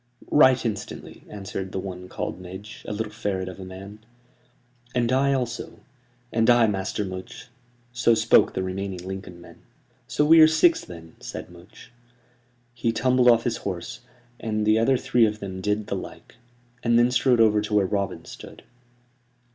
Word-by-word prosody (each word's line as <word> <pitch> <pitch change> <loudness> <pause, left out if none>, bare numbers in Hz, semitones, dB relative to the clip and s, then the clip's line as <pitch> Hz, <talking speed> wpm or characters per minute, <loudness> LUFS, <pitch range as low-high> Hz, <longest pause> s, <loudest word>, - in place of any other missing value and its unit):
"Right 130 -4 +5
instantly," 105 -3 -6
answered 95 -2 -6
the - - -3
one 90 -1 -7
called - - -5
Midge, 95 +4 -10
a - - -4
little 105 0 -4
ferret 100 -4 -3
of 95 +1 -8
a - - -7
man. 95 +3 -10 1.0
"And 120 -1 +1
I 135 +2 +3
also." 120 -3 -3 0.6
"And 115 +1 +2
I, 120 -1 +6
Master 105 0 -2
Much" 95 +6 -8 0.4
so 120 -1 +3
spoke - - +4
the 95 - -1
remaining 95 -1 -5
Lincoln 95 -2 -7
men. 85 - -15 0.5
"So 150 - +1
are - - -1
we 160 -1 +9
six, 160 +2 +3
then," 80 -2 -12
said - - -8
Much. 85 +3 -16 0.8
He 115 -1 -1
tumbled 125 +1 +2
off 115 -1 +5
his 120 -2 -1
horse, 95 +6 -5 0.4
and 110 -2 -2
the 110 +1 +4
other 130 +3 +3
three 120 -2 +3
of 105 0 -4
them 95 -2 -6
did 105 +2 -1
the - - -3
like; - - -9 0.5
and 120 -1 +3
then 120 +1 +4
strode 125 -1 +3
over 105 -2 +4
to 105 0 -5
where 100 -2 +4
Robin 100 -3 -3
stood. - - -12
105 Hz, 170 wpm, -24 LUFS, 95-120 Hz, 1.0 s, we